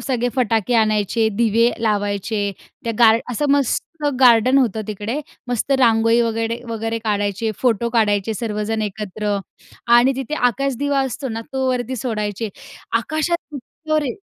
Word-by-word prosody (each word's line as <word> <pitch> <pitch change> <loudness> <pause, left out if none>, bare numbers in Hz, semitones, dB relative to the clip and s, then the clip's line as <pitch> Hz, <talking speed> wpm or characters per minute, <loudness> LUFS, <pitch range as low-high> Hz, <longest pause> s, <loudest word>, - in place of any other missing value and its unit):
सगळे 245 -2 0
फटाके 230 -1 +1
आणायचे, 215 0 +2
दिवे 230 +1 +3
लावायचे. 205 -1 -1 0.3
त्या 230 - -1
गार्ड 225 -1 +6
असं 280 +4 0
मस्त 285 +3 -1 0.2
गार्डन 250 +1 +6
होतं 225 -5 +1
तिकडे. 215 +6 -3 0.3
मस्त 245 +3 -1
रांगोळी 230 -1 +4
वगैडे 230 0 -1
वगैरे 225 0 -2
काढायचे. 205 0 -1
फोटो 235 -2 +1
काढायचे 215 -2 +1
सर्वजण 215 0 -2
एकत्र. 210 0 -3 0.5
आणि 240 +3 +5
तिथे 270 +3 -3
आकाश 275 +2 -2
दिवा 285 -1 +1
असतो 265 +1 -3
ना, 225 -1 -4
तो 265 -1 0
वरती 250 0 -2
सोडायचे. 215 -2 -3 0.5
आकाशात 310 +7 -1 0.2
इतकं 310 +3 -3
रे 255 - -2
230 Hz, 140 wpm, -20 LUFS, 215-255 Hz, 0.5 s, गार्ड